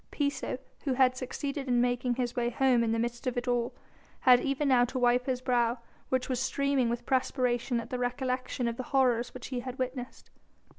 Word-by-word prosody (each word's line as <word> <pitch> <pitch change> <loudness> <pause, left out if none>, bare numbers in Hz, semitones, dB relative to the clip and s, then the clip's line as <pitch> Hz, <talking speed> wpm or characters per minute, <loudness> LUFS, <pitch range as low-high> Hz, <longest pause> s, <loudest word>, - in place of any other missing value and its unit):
Piso, 280 -3 -2 0.3
who 270 - +1
had 255 -1 +4
succeeded 275 +2 -4
in 245 -1 +3
making 245 0 +1
his 245 -1 -2
way 240 -1 +1
home 245 0 +3
in 225 - 0
the 225 - +1
midst 240 +3 -3
of 250 - -1
it 245 +1 -2
all, 240 -1 0 0.5
had 250 -2 +7
even 275 +2 -1
now 255 -2 +5
to 250 +2 -2
wipe 245 +1 +2
his 255 -1 -1
brow, 240 -1 +1 0.3
which 260 -1 0
was 255 -2 -1
streaming 275 -1 +1
with 240 0 -3
perspiration 250 -2 0
at 230 0 -8
the 250 - -2
recollection 255 0 -2
of 230 0 -2
the 255 - -3
horrors 245 -2 +2
which 250 - -7
he 255 -2 -2
had 255 +1 -6
witnessed. 255 -1 -5
250 Hz, 205 wpm, -30 LUFS, 240-260 Hz, 0.5 s, had